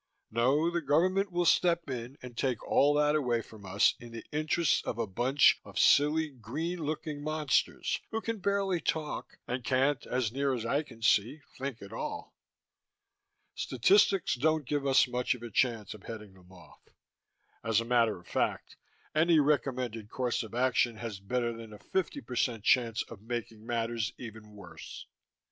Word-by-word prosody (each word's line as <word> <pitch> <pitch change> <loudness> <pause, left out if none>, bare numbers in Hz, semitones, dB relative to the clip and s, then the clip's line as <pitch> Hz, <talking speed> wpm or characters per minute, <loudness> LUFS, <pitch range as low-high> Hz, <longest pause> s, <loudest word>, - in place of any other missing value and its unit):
No, 135 +9 +2
the 170 0 -1
Government 185 +7 +2
will 175 0 0
step 170 -1 +3
in 125 0 -5
and 125 -2 -9
take 125 -2 -2
all 145 +1 +4
that 150 0 +3
away 120 -6 +1
from 105 -3 -13
us 95 +2 +4
in 120 -2 -11
the 115 -1 -8
interests 155 +2 +1
of 115 - -4
a 115 - 0
bunch 125 +8 +3
of - - -11
silly 155 +2 +4
green 145 +8 -4
looking 155 -1 -4
monsters 155 -2 0
who 225 - -2
can 225 -1 -4
barely 195 -2 0
talk 155 -2 -3
and 125 +1 -3
can't, 130 +3 +1
as 125 -3 0
near 135 +1 0
as 115 -2 -4
I 140 +5 +1
can 115 -7 -13
see, 120 +7 +2
think 130 -5 -5
at 100 - -10
all. - - -5 1.2
Statistics 195 - +3
doesn't 155 +3 +1
give 145 +1 -1
us 135 0 +5
much 125 0 0
of 120 - -12
a 120 - -7
chance 115 -2 0
of 105 - -13
heading 105 -3 -9
them 90 -1 -19
off. 90 -2 -17 0.8
As 115 -1 +2
a 115 - -3
matter 115 -3 +2
of 90 - -19
fact, - - -2 0.4
any 160 +1 +4
recommended 130 -7 0
course 125 -1 -1
of 110 0 -8
action 125 -2 +2
has 110 -3 -6
better 120 +4 -1
than 115 -1 -10
a - - -10
50% 120 - -2
chance 120 -2 +3
of 115 -4 -12
making 115 -1 -6
matters 115 -3 -1
even 110 -3 -10
worse. 100 -4 -10
125 Hz, 170 wpm, -30 LUFS, 115-150 Hz, 1.2 s, us